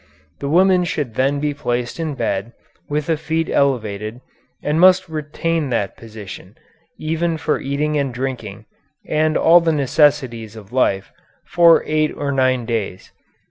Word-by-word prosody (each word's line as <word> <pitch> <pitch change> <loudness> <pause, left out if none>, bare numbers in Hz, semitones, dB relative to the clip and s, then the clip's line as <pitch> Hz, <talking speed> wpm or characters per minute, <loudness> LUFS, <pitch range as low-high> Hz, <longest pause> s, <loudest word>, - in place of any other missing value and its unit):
The 140 - -3
woman 180 +3 +4
should 150 -7 -3
then 135 +4 +1
be 150 0 -1
placed 120 -1 -3
in 160 -3 -3
bed, 115 -2 -2 0.4
with 150 0 -1
the 165 - +1
feet 160 +1 -2
elevated, 110 -5 0 0.4
and 150 +2 0
must 185 +1 +5
retain 155 0 -2
that 105 -6 -1
position, 105 -2 -10 0.4
even 165 +1 -1
for 155 -1 -1
eating 150 +2 -1
and 140 -2 -1
drinking, 115 -4 -5 0.4
and 155 0 +1
all 170 +2 +6
the 165 -1 +1
necessities 135 -6 +1
of 110 +1 -13
life, 100 -7 +1 0.3
for 170 -1 +5
eight 155 0 +1
or 145 -1 -2
nine 130 -3 +1
days. 110 -5 -4
140 Hz, 145 wpm, -19 LUFS, 115-155 Hz, 0.4 s, all